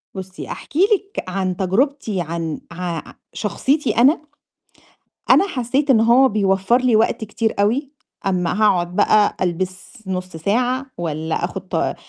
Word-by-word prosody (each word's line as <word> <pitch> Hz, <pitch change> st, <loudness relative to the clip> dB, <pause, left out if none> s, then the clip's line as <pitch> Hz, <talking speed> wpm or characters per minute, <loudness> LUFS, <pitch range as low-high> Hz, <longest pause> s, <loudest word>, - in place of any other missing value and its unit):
بُصّي 190 Hz, 0 st, -7 dB
أحكي 305 Hz, -, -6 dB
لِك 400 Hz, 0 st, +1 dB
عن 185 Hz, -1 st, -2 dB
تجربتي 215 Hz, +1 st, 0 dB
عن 165 Hz, -1 st, -4 dB
ع 170 Hz, -2 st, -4 dB, 0.3 s
شخصيتي 270 Hz, +6 st, 0 dB
أنا، 275 Hz, +7 st, +5 dB, 1.1 s
أنا 395 Hz, -, +6 dB
حسّيت 270 Hz, -2 st, -1 dB
إن 225 Hz, -4 st, +5 dB
هو 240 Hz, +4 st, +5 dB
بيوفّر 195 Hz, +1 st, +2 dB
لي 250 Hz, -3 st, +3 dB
وقت 220 Hz, 0 st, +2 dB
كتير 220 Hz, +1 st, -1 dB
أوي، 250 Hz, +8 st, +1 dB, 0.4 s
أمّا 185 Hz, +2 st, 0 dB
هاقعد 175 Hz, -4 st, +2 dB
بقى 210 Hz, +1 st, +3 dB
ألبس 185 Hz, +6 st, -4 dB
نُص 185 Hz, -2 st, -4 dB
ساعة 245 Hz, -, 0 dB
والّا 160 Hz, -1 st, -2 dB
آخد -, -, -6 dB
ط -, -, -1 dB
205 Hz, 135 wpm, -20 LUFS, 185-255 Hz, 1.1 s, أنا